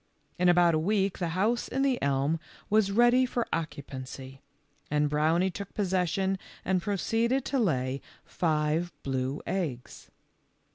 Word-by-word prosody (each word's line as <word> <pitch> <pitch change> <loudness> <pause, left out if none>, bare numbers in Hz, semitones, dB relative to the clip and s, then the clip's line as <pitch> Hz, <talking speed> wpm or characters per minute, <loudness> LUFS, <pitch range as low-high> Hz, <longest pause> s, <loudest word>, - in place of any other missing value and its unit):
In 180 0 +4
about 175 -1 +5
a 155 - +2
week 195 +2 0
the 175 - 0
house 230 +5 +1
in 270 - -1
the 265 -3 +1
elm 140 +3 +1 0.3
was 210 -2 +3
ready 240 +4 +5
for 245 -2 -1
occupancy, 135 -3 -5 0.5
and 150 0 +2
Brownie 160 +5 +2
took 200 +1 -8
possession 190 0 0 0.3
and 185 -1 +1
proceeded 230 +7 0
to 275 - 0
lay 135 - 0 0.2
five 160 +1 0
blue 130 +1 -2
eggs. 150 -11 -4
175 Hz, 135 wpm, -29 LUFS, 150-205 Hz, 0.5 s, about